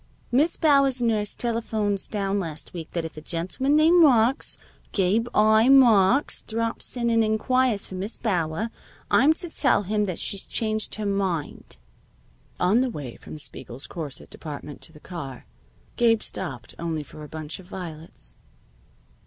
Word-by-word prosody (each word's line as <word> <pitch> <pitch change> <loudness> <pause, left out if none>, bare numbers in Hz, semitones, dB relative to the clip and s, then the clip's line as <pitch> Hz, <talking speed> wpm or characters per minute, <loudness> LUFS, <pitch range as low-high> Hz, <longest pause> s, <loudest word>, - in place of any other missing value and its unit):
"Miss 295 +7 +2
Bauer's 275 -4 +3
nurse 220 -3 0
telephones 220 -4 -1
down 200 -1 -1
last 160 -4 -6
week 165 -3 -7
that 170 -2 -2
if 160 - -8
a - - -6
gentleman 185 - -1
named 330 +3 +6
Marks 255 -4 +3 0.4
Gabe 205 +4 +2
I. 220 +3 +4
Marks 245 -1 +5
drops 230 +2 -3
in 235 -1 +1
and 225 -1 +4
inquires 220 +1 +1
for - - -10
Miss 195 +4 -3
Bauer, 185 0 -1 0.4
I'm 290 - +6
to 350 +2 -5
tell 280 -9 +2
him 210 +2 0
that 185 -4 -4
she's 200 - 0
changed 215 -1 +1
her 215 - -4
mind." 190 - -2 0.8
On 200 +7 +3
the 260 - +1
way 140 - -7
from - - -10
Spiegel's 130 -2 -8
corset 150 -5 -7
department 145 -1 -8
to - - -4
the 150 - -15
car, 140 -7 -8 0.5
Gabe 230 -2 +3
stopped 145 -10 -4
only 165 -2 -2
for 150 +1 -11
a 150 - -10
bunch 155 +1 -5
of 185 - -14
violets. 165 -4 -9
205 Hz, 155 wpm, -25 LUFS, 165-235 Hz, 0.8 s, named